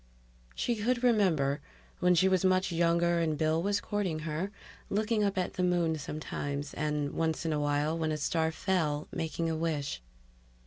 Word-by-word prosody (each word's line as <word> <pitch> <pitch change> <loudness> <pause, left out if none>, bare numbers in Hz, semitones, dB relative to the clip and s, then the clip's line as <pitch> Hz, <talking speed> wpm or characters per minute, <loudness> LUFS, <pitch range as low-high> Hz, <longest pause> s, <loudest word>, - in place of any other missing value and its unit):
She 240 -2 0
could 240 +3 0
remember, 165 - +3 0.4
when 180 0 +4
she 185 +3 +4
was 185 -1 +2
much 185 0 +3
younger 170 0 +2
and 160 -2 0
Bill 155 +1 +2
was 200 +2 +1
courting 200 -6 -2
her, 165 +5 -2 0.4
looking 215 +1 +1
up 200 -1 0
at 185 - -1
the 180 - -1
moon 175 -3 +2
sometimes; 145 -1 -4
and 150 -1 -1
once 160 0 -1
in 160 - +1
a 150 - 0
while, 145 +2 +1
when 160 -1 -1
a 155 - -1
star 160 +2 0
fell, 160 -4 0
making 165 +1 -2
a 160 - 0
wish. 155 - -2
165 Hz, 175 wpm, -30 LUFS, 150-185 Hz, 0.4 s, when